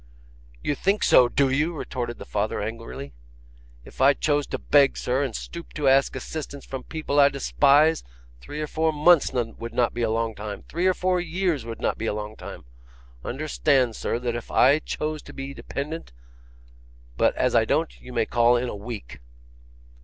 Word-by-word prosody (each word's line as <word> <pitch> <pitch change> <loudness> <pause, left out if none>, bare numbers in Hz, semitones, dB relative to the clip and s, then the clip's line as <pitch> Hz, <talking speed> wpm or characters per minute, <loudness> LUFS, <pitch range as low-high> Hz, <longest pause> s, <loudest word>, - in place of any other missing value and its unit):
'YOU 145 - 0
think 195 +7 0
so, 125 -1 +6
do 140 +2 +2
you?' 150 +6 0
retorted 120 -5 -4
the - - -9
father, 105 +1 -2
angrily. 110 - -6 0.7
'If - - -10
I 140 +2 +6
chose 145 -1 0
to - - -3
beg, 140 -2 +3
sir, 125 +2 0
and 135 -6 -2
stoop 170 0 -8
to 150 -2 -1
ask 135 0 +4
assistance 140 +1 -6
from 135 -1 -6
people 155 -2 -1
I 140 0 +7
despise, 145 +3 +3 0.4
three 145 - -7
or - - -1
four 160 +1 0
months 155 +1 +4
would 115 -1 -4
not 120 -2 +2
be 120 - -4
a 115 - +1
long 115 0 -1
time; 105 -1 -7
three 175 +3 -1
or 185 - +3
four 180 0 +1
years 175 -6 -1
would 115 -1 -7
not - - -1
be 115 - -2
a 105 - -1
long 105 0 -6
time. - - -10 0.6
Understand, 135 -3 +1
sir, - - -2
that 120 -1 -2
is 120 - -2
if - - -21
I 140 +4 +5
chose 155 -1 -4
to - - -13
be 135 +1 -6
dependent; 150 - -6 1.0
but - - +2
as - - +1
I - - +5
don't, - - -1
you 125 - -11
may 115 -2 +1
call 120 +1 +3
in 125 0 -2
a - - -5
week. 100 - -8
135 Hz, 190 wpm, -25 LUFS, 115-150 Hz, 1.0 s, I